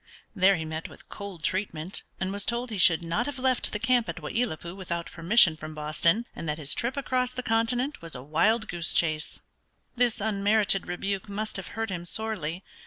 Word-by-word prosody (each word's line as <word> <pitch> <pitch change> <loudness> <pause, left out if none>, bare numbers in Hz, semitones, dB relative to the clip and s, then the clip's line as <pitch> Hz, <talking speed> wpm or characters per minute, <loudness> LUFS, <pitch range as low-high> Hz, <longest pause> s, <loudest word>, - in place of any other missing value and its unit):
There 195 0 +5
he 160 -2 -4
met 160 +1 -5
with - - -15
cold 200 -5 -8
treatment, 185 -2 -1 0.2
and 190 0 -1
was 200 0 -1
told 240 +1 -1
he 210 - -3
should 170 -1 +5
not 170 +10 -1
have 290 -1 -4
left 255 -1 +1
the - - -1
camp 230 -1 +2
at 165 0 -4
Wai 150 - -6
i 240 - +2
lat 155 -10 -6
pui 170 +1 -7
without 170 -3 -4
permission 170 0 +6
from 155 0 -8
Boston, 155 +8 +1
and 165 - -5
that 150 - -1
his 150 -2 +1
trip 245 +4 -1
across 255 -2 +1
the 255 0 -5
continent 240 +5 +1
was 165 -3 -7
a 125 - -7
wild 215 - +2
goose 170 -2 -1
chase. 155 -2 0 0.5
This 240 -1 +2
unmerited 205 -1 +2
rebuke 195 +3 -3
must 215 +2 -3
have 190 - -6
hurt 225 -2 -2
him 175 -1 -4
sorely. 185 -4 -3
195 Hz, 210 wpm, -27 LUFS, 165-225 Hz, 0.5 s, permission